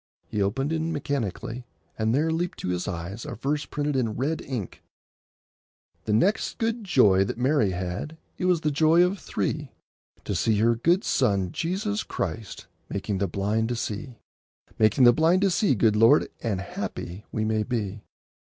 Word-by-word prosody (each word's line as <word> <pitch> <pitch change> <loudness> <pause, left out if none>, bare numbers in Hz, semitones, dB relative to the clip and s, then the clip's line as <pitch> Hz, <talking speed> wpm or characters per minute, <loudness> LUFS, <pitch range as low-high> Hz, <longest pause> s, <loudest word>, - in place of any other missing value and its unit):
He 105 - -2
opened 135 +10 0
in 160 +1 -1
mechanically, 125 - -3 0.3
and 110 0 0
there 155 +6 +2
leaped 170 +2 -2
to - - -3
his 90 0 -2
eyes 90 +5 -5
a - - -6
verse 140 +5 -2
printed 145 -1 -2
in 115 -5 0
red 145 +6 -1
ink— - - -5 1.2
The 105 - 0
next 195 - +1
good 230 0 -1
joy 105 - +4
that 100 - -4
Mary 130 -3 +2
had, 90 - -4 0.2
It - - -1
was 180 -3 +3
the 150 - +1
joy 160 +4 +5
of 185 +2 0
three, 150 -2 -3 0.5
To - - -3
see 110 -2 +1
her 115 +3 +4
good 170 - +2
Son 100 -8 +1
Jesus 205 - -2
Christ 110 -3 -5 0.2
Making 100 0 -2
the 100 - +1
blind 105 +5 -1
to 120 - -1
see; 115 +2 -5 0.6
Making 110 +4 +4
the 120 -1 +8
blind 165 +7 +3
to 195 - +3
see, 175 -4 +2
good 105 0 +3
Lord, 115 +7 +5
And 100 -5 -1
happy 90 +1 -6
we 110 -1 -1
may 110 0 +1
be. 105 -3 -3
120 Hz, 170 wpm, -26 LUFS, 105-160 Hz, 1.2 s, the